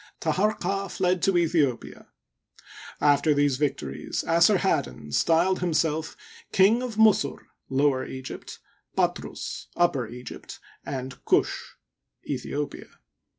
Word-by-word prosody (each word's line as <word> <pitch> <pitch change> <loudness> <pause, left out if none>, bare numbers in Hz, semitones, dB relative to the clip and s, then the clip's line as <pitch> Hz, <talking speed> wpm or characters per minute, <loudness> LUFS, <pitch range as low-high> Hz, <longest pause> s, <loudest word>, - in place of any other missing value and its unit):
Taharqa 195 +3 0
fled 180 -1 0
to 195 - +3
Aethiopia. 160 -8 0 0.9
After 145 +1 +3
these 145 -2 +2
victories 135 - -2
Assarhaddon 170 - +2
styled 170 - +3
himself 160 -2 0 0.2
" - - -21
King 205 +6 +4
of 250 -3 -4
Musur 215 -10 +4 0.3
(Lower 135 -1 +2
Egypt), 130 0 -8 0.4
Patrus - - -2
(Upper 140 -9 +1
Egypt), 125 +2 -9 0.3
and 130 -1 -6
Ktish - - +1 0.5
(Aethiopia). 145 0 -4
160 Hz, 100 wpm, -26 LUFS, 140-185 Hz, 0.9 s, King